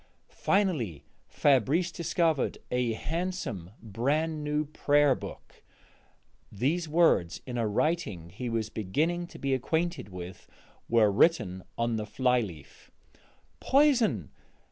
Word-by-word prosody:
Finally, 155 - 0 0.2
Fabrice 145 - +2
discovered 165 -3 0
a 125 -2 +1
handsome 165 - -4
brand 150 +9 -1
new 150 +1 0
prayer 145 -1 +3
book: - - -10 0.9
these 155 - -1
words, 150 - +3
in 125 - -6
a 115 -2 0
writing 105 - -1
he 120 +7 -5
was 115 -2 -1
beginning 160 - -1
to - - -12
be 135 -1 -1
acquainted 160 - -1
with, 90 -1 -9 0.4
were 115 -3 +4
written 100 - +2
on 115 -1 0
the 105 -1 -4
fly 125 +4 +2
leaf: 85 -10 -10 0.7
"_Poison! 245 - +3
130 Hz, 115 wpm, -29 LUFS, 105-165 Hz, 0.9 s, were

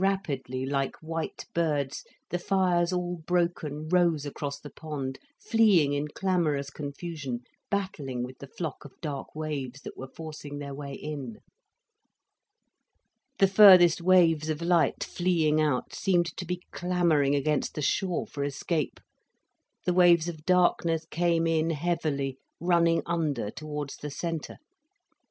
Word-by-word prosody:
Rapidly, 140 -10 -1
like 135 0 -1
white 165 0 -5
birds, 150 -5 0 0.3
the 175 - 0
fires 180 -2 +2
all 180 -1 -2
broken 165 -3 -1
rose 170 -4 +2
across 140 0 -4
the 145 - -10
pond, 140 -4 -5 0.2
fleeing 210 - +4
in 145 +1 -1
clamorous 150 -5 0
confusion, 145 -3 -5 0.3
battling 155 -11 -2
with 125 +1 -8
the 140 - -9
flock 155 0 -5
of 145 - -14
dark 145 -4 -5
waves 140 -4 -4
that - - -8
were 130 - -7
forcing 150 0 -8
their 140 -1 -6
way 140 0 -6
in. 140 -7 -6 2.0
The 195 - +6
furthest 185 -4 +8
waves 170 -4 +4
of 155 -1 -1
light, 170 -1 +2
fleeing 160 -4 +1
out, 145 -5 0
seemed 175 -3 +1
to 180 - -5
be 180 0 -3
clamouring 170 -6 +2
against 150 +1 0
the 150 - -3
shore 180 +4 0
for 140 - -5
escape, 145 +2 -2 0.9
the 180 - +2
waves 175 -2 +5
of 160 -3 -7
darkness 170 -3 +3
came 170 -1 +2
in 165 0 +2
heavily, 150 -4 -1 0.2
running 170 -1 +3
under 150 -11 -1
towards 150 -1 -6
the 150 - -6
centre. 165 +2 -4
155 Hz, 135 wpm, -28 LUFS, 145-175 Hz, 2.0 s, furthest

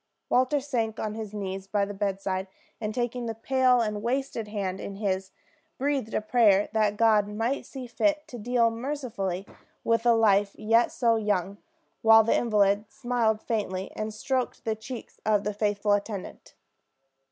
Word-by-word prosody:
Walter 255 +4 +3
sank 235 -6 -2
on 215 -1 -2
his 215 -2 -6
knees 195 -2 -5
by 200 0 +1
the 205 - -6
bedside 195 -1 -2 0.3
and 215 -1 -2
taking 240 +1 -2
the 225 - -3
pale 255 +1 +3
and 210 -2 -2
wasted 240 -1 -2
hand 195 -3 -3
in 200 - -6
his, 195 -2 -2 0.5
breathed 270 -4 -1
a - - +1
prayer 215 -3 +4
that 210 -1 +1
God 215 -2 +4
might 225 +6 -2
see 265 -2 -7
fit 300 +5 0
to 245 - -8
deal 235 +1 +2
mercifully 225 -7 -3 0.4
with 230 0 +2
a 235 - +6
life 205 -2 +3
yet 225 +2 +3
so 230 -2 +2
young; 200 -2 -1 0.4
while 225 0 +7
the 230 - +2
invalid 210 -2 +2
smiled 235 -3 0
faintly, 195 -4 -2
and 215 0 -3
stroked 255 +3 -2
the 220 - +1
cheek 235 +3 -8
of 210 -1 +2
his 210 -1 -2
faithful 205 0 0
attendant. 205 -1 -3
220 Hz, 165 wpm, -27 LUFS, 205-240 Hz, 0.5 s, while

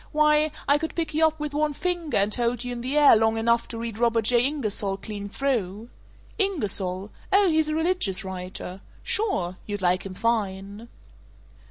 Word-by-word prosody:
Why, 300 0 +3 0.2
I 285 +1 +4
could 320 +1 -4
pick 330 -2 -2
you 320 +1 +4
up 315 0 -4
with 300 -1 -4
one 300 0 0
finger, 350 -1 -1
and 200 +1 +2
hold 240 0 0
you 250 - -4
in 240 -1 -5
the 260 +4 -1
air 295 -4 +8
long 220 +1 +2
enough 235 +1 +1
to 230 - -7
read 230 -1 -5
Robert 230 -1 +2
J. 240 +1 +4
Ingersoll 215 -9 -1
clean 205 0 -6
through. 225 -4 -2 0.5
Ingersoll? 205 - -1 0.2
Oh, 395 0 +5
he's 315 -2 +2
a 305 - -1
religious 320 - 0
writer. 185 0 -7 0.2
Sure. 185 - -1
You'd 205 -2 -4
like 180 +1 +2
him 190 -1 -7
fine." 205 -1 -2
235 Hz, 180 wpm, -25 LUFS, 200-300 Hz, 0.5 s, air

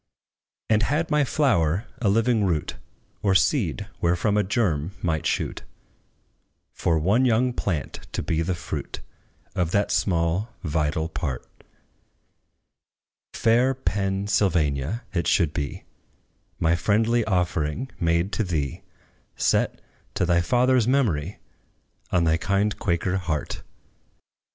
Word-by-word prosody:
And 110 -1 +3
had 155 +7 0
my 150 0 +4
flower 110 - +1 0.2
a 105 - +2
living 115 +1 +2
root, 85 -6 -1 0.5
Or 100 -2 +2
seed 100 - +1
wherefrom 90 +5 +2
a 105 - +4
germ 95 - 0
might 80 -3 0
shoot - - -2 1.1
For 80 -1 +1
one 100 +11 +2
young 125 0 +2
plant 85 -10 -3
to - - -2
be 80 - 0
the 90 +2 -1
fruit 85 - -6 0.5
Of 90 -4 0
that 100 +3 +1
small 90 +5 0
vital 80 0 0
part, 75 -6 -4 1.9
Fair 120 +4 +3
PENN 100 -5 -1
SYLVANIA, 85 - +1
it 85 -3 0
should 80 -5 +2
be, 70 -4 -4 0.8
My 80 +1 +3
friendly 110 +6 +2
offering 90 - -1
made 85 +2 +1
to 110 - 0
thee 75 - -2 0.5
Set, - - +1 0.3
to 95 -2 +1
thy 85 0 +3
father's 125 +5 +3
memory, 105 - +1 0.7
On 90 -2 +3
thy 80 0 +3
kind 100 +4 0
Quaker 90 +1 0
heart. 80 -5 -3
95 Hz, 120 wpm, -24 LUFS, 80-110 Hz, 1.9 s, my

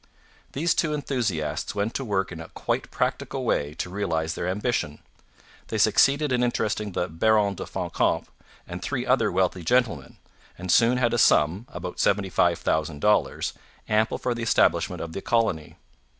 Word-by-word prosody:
These 165 +5 +1
two 155 -2 0
enthusiasts 115 - -2
went 105 +2 -1
to 135 - -3
work 95 -5 -1
in 85 - -7
a 80 - -9
quite - - -3
practical - - -2
way 75 +1 -1
to 90 - -4
realize 80 -5 -1
their 85 - -3
ambition. 95 -5 -1 0.7
They 110 - -3
succeeded 135 +8 +3
in 125 -1 +2
interesting 105 -4 -1
the 90 - -1
Baron 100 +4 +2
de - - -7
Fancamp - - -1 0.4
and - - -6
three - - -2
other - - +2
wealthy 90 -1 0
gentlemen, 110 - 0 0.4
and 90 0 -3
soon 120 +5 +4
had 120 -2 +1
a - - +1
sum 90 +10 +3
about 90 -10 -7
$75,000 85 -2 +1 0.3
ample 110 +1 +1
for 125 - -1
the 120 - -6
establishment 115 - +2
of 80 -1 -7
the 95 - -5
colony. 110 -11 0
100 Hz, 155 wpm, -25 LUFS, 85-120 Hz, 0.7 s, soon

